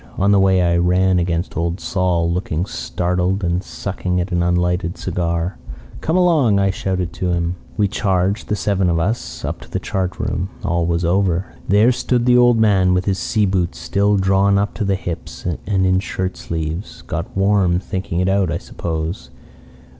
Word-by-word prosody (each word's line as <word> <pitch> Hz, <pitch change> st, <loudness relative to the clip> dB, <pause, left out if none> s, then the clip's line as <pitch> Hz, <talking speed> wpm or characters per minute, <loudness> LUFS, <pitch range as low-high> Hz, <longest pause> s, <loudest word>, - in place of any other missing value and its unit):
On 100 Hz, +1 st, +3 dB
the 100 Hz, -, +5 dB
way 95 Hz, -1 st, +4 dB
I 85 Hz, 0 st, +2 dB
ran 90 Hz, +1 st, +3 dB
against 85 Hz, +1 st, -2 dB
Old 85 Hz, +2 st, -1 dB
Sol, 90 Hz, -3 st, 0 dB
looking 90 Hz, -1 st, -2 dB
startled 90 Hz, +1 st, -1 dB
and 85 Hz, +1 st, 0 dB
sucking 90 Hz, -2 st, -3 dB
at 90 Hz, +2 st, -3 dB
an 85 Hz, 0 st, +1 dB
unlighted 90 Hz, +1 st, 0 dB
cigar. 85 Hz, 0 st, -2 dB, 0.4 s
"'Come 160 Hz, +3 st, +1 dB
along,' 155 Hz, -, +4 dB
I 100 Hz, -1 st, +2 dB
shouted 95 Hz, -2 st, -2 dB
to 90 Hz, +2 st, -2 dB
him. 85 Hz, 0 st, 0 dB, 0.2 s
"We 105 Hz, -, +3 dB
charged, 95 Hz, 0 st, 0 dB
the 105 Hz, -, 0 dB
seven 95 Hz, -3 st, +1 dB
of 85 Hz, -, +1 dB
us, 80 Hz, -, -2 dB
up -, -, -4 dB
to -, -, -13 dB
the -, -, -2 dB
chart 95 Hz, -2 st, -2 dB
room. 90 Hz, +2 st, -2 dB, 0.2 s
All 85 Hz, -2 st, +1 dB
was 85 Hz, 0 st, 0 dB
over. 90 Hz, 0 st, +1 dB
There 105 Hz, +5 st, +5 dB
stood 120 Hz, 0 st, 0 dB
the 125 Hz, 0 st, +5 dB
old 120 Hz, -1 st, +5 dB
man 95 Hz, -4 st, +3 dB
with 90 Hz, +1 st, 0 dB
his 95 Hz, -2 st, 0 dB
sea 110 Hz, -3 st, +1 dB
boots 95 Hz, -3 st, -1 dB
still 100 Hz, +1 st, +1 dB
drawn 95 Hz, +1 st, +3 dB
up 100 Hz, +1 st, 0 dB
to 110 Hz, -, -3 dB
the 100 Hz, 0 st, +1 dB
hips 90 Hz, -2 st, -6 dB
and 95 Hz, +3 st, -1 dB
in 95 Hz, 0 st, +3 dB
shirt 95 Hz, -1 st, -3 dB
sleeves 80 Hz, +3 st, -5 dB
got -, -, -5 dB
warm 95 Hz, -3 st, +3 dB
thinking 90 Hz, -1 st, -3 dB
it 90 Hz, -, +1 dB
out, 95 Hz, -3 st, +2 dB
I 85 Hz, -, -1 dB
suppose. 80 Hz, +1 st, -5 dB
95 Hz, 185 wpm, -19 LUFS, 85-100 Hz, 0.4 s, the